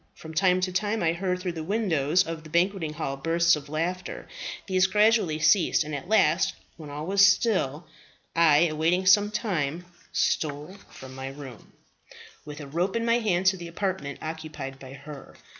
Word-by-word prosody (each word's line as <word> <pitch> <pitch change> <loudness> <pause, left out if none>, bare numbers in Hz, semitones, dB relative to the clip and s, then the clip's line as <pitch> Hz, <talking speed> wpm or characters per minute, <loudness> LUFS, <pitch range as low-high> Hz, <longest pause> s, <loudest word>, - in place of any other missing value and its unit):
From 160 0 -10
time 185 +2 +3
to 185 0 -1
time 205 +2 -1
I 165 0 +2
heard 180 +1 -2
through 180 -1 -2
the 165 -2 -6
windows 175 -5 +1
of 165 -1 -6
the 155 - -12
banqueting 170 -1 0
hall 150 -3 -3
bursts 170 +3 +3
of 150 -1 -9
laughter. 175 +4 -4 0.4
These 185 -1 +2
gradually 210 -5 +3
ceased; 160 +2 +3
and 155 +1 -7
at 145 +4 -5
last, 190 -4 +3 0.2
when 155 -3 -10
all 145 +2 -6
was 195 +2 +3
still, 185 - +2 0.5
I, 160 -3 +5
awaiting 170 +3 +1
some 205 +2 +5
time, 180 - -2 0.3
stole 150 +4 -1
from 130 0 -11
my 135 0 -6
room 135 -4 -10 0.7
with 150 0 -8
a - - -7
rope 170 +9 -2
in 230 0 0
my 235 +1 +3
hand 190 -5 0
to 190 0 +4
the 170 -1 -8
apartment 170 -5 -3
occupied 155 -4 -6
by 130 0 -11
her. 140 0 -11
170 Hz, 175 wpm, -26 LUFS, 150-190 Hz, 0.7 s, I